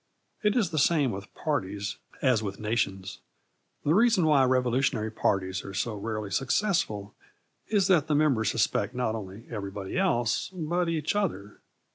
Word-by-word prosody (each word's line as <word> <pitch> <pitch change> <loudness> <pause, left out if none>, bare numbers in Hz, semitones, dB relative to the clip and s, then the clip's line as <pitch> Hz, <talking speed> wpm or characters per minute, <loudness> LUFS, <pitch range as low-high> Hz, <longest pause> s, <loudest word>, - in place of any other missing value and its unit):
It 210 0 +2
is 200 -8 +1
the 155 - 0
same 145 -3 +3
with 100 +1 -7
parties 100 -9 -2 0.3
as 130 -5 +3
with 100 -2 -5
nations. 100 -3 -2 0.7
The 150 - +3
reason 220 -3 +4
why 145 -4 +5
revolutionary 125 -3 +1
parties 95 -3 0
are 100 - -8
so 110 +2 -1
rarely 105 -1 -4
successful 120 - 0 0.5
is 205 -4 +2
that 175 -6 +3
the 150 - +1
members 135 -8 +3
suspect 110 +1 0
not 125 -3 0
only 105 +1 -7
everybody 100 - -4
else 120 - +1
but 175 +1 -1
each 160 +2 -1
other. 160 - -2
120 Hz, 150 wpm, -28 LUFS, 100-155 Hz, 0.7 s, why